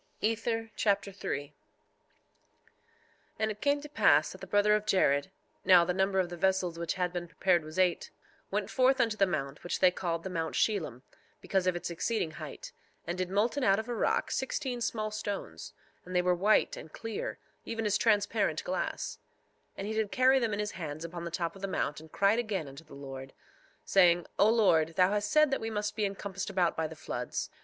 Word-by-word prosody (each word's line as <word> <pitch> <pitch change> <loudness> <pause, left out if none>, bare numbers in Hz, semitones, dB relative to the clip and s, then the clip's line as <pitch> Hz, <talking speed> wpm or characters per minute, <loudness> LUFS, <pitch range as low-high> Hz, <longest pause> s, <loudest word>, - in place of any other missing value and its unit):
Ether 225 +1 -1
Chapter 200 -1 +1
3 145 -7 -4
3:1 - - -33 1.8
And 220 0 0
it 210 - -9
came 285 0 +2
to 295 - -8
pass 155 - +4
that 190 - -12
the 190 - -7
brother 205 +2 +3
of 210 0 0
Jared, 145 -7 +3 0.3
(now 180 -2 +7
the 180 - 0
number 190 +1 +1
of 180 -2 +1
the 175 - -7
vessels 185 -2 +1
which 170 -1 -2
had 180 -1 -1
been 175 -1 -4
prepared 175 -1 +2
was 155 +2 -9
eight) 180 -2 +2 0.4
went - - -2
forth 260 +1 +3
unto 230 -3 +2
the 195 -2 +3
mount, 140 -4 -3
which 175 - -2
they 185 -1 +6
called 170 -2 -3
the 190 - -4
mount 165 -2 -2
Shelem, 160 - 0 0.4
because 190 -2 0
of 180 - +2
its 175 - -4
exceeding 170 0 -1
height, - - -8 0.3
and 175 - -3
did 185 -1 -2
molten 230 +8 +1
out 195 -3 +4
of 220 +2 -4
a 245 - -2
rock 225 - 0
sixteen 265 -2 -2
small 215 -2 -2
stones; 200 - -5 0.3
and 180 0 -8
they 180 - +3
were 180 0 +3
white 200 +5 +3
and 160 - -10
clear, 225 +3 -5 0.3
even 225 -1 -4
as 205 -1 +2
transparent 210 -1 +2
glass; - - -3 0.6
and 195 - -4
he 215 - -3
did 220 -2 -1
carry 260 +1 +4
them 230 -3 0
in 205 - -1
his 210 0 -2
hands 155 -2 -6
upon 170 0 -6
the - - -3
top 170 +1 -3
of 195 - -12
the 195 - -2
mount, 150 -5 -2
and 160 0 -14
cried 200 +3 +3
again 200 -9 -2
unto 140 +4 -11
the 150 - -14
Lord, 135 -1 -8 0.5
saying: 175 -2 +5
3:2 - - -18
O 205 - +6
Lord, 195 -9 +4
thou 185 +1 +4
hast 205 0 0
said 305 -2 +4
that 270 - 0
we 225 - -2
must 210 -1 -2
be 215 -2 0
encompassed 195 -1 -4
about 180 -3 +1
by 160 -1 -1
the 160 - -10
floods. - - -4
195 Hz, 215 wpm, -30 LUFS, 170-220 Hz, 1.8 s, now